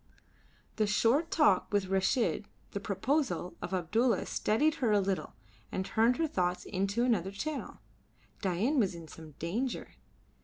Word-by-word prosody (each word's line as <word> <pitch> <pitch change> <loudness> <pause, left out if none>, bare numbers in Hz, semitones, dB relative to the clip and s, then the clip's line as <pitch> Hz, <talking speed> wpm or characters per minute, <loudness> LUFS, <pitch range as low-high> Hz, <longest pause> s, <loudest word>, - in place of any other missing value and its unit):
The 215 -2 +2
short 235 +10 +3
talk 295 - +3
with 205 -2 +2
Reshid, 200 +3 +1 0.3
the 200 - -3
proposal 200 - -1
of 175 - -5
Abdulla 195 +5 +1
steadied 295 +9 +2
her 235 -4 +3
a 205 - +5
little 195 -1 -2 0.4
and 190 - -2
turned 230 +5 +3
her 330 - +2
thoughts 180 -9 -1
into 200 +4 0
another 210 -7 +1
channel. 265 - -5 0.6
Dain 205 - +1
was 195 -6 +1
in 165 -1 -9
some 155 -1 -12
danger. 220 - -3
205 Hz, 145 wpm, -31 LUFS, 185-250 Hz, 0.6 s, a